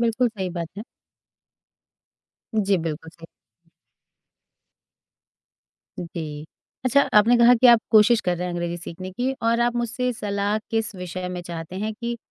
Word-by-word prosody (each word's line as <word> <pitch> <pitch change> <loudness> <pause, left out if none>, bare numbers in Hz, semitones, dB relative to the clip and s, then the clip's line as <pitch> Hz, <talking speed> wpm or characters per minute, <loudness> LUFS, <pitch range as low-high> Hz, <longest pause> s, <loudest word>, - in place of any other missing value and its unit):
बिल्कुल 235 +1 +2
सही 195 -5 -4
बात 170 -1 -4
है। - - -5 1.7
जी, 200 -2 +2
बिल्कुल 160 0 -5
सही। 165 0 -14 2.7
जी। 155 -3 -6 0.4
अच्छा, 280 +3 +4
आपने 225 +3 +6
कहा 235 +1 +7
कि 245 +2 +4
आप 235 -2 +7
कोशिश 220 +1 +6
कर 180 -3 -1
रहे 180 - -3
हैं 180 - -4
अंग्रेज़ी 175 0 -3
सीखने 180 +2 -8
की 250 +6 -1
और 230 +1 +2
आप 240 0 +2
मुझसे 240 +1 -1
सलाह 205 -1 -1
किस 225 -2 -1
विषय 180 0 -5
में 180 0 -5
चाहते 170 0 -7
हैं 215 +3 -2
कि 235 +2 -4
205 Hz, 145 wpm, -23 LUFS, 175-235 Hz, 2.7 s, कहा